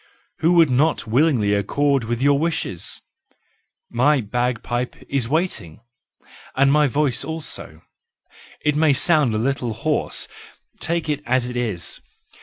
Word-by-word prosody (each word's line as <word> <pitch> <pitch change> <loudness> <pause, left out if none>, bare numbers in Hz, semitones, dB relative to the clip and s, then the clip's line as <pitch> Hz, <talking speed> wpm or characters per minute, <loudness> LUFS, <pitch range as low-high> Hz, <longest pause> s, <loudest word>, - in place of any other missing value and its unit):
Who 165 +2 +3
would 165 -5 +5
not 145 +5 +2
willingly 115 -3 +2
accord 135 +6 +1
with 120 +2 -2
your 140 0 +4
wishes? 155 - -3 0.8
My 135 +5 +2
bagpipe 120 +2 -2
is 130 -4 -1
waiting, 155 - -1 0.8
and 135 +1 +4
my 150 0 +4
voice 140 -1 +1
also—it 150 -1 -6
may 155 -1 +4
sound 145 -5 +2
a - - +1
little 125 0 -1
hoarse; 150 +7 -1 0.5
take 170 -1 -1
it 150 -1 -1
as 125 0 +1
it - - -8
is! 105 - -2
135 Hz, 125 wpm, -21 LUFS, 120-150 Hz, 0.8 s, would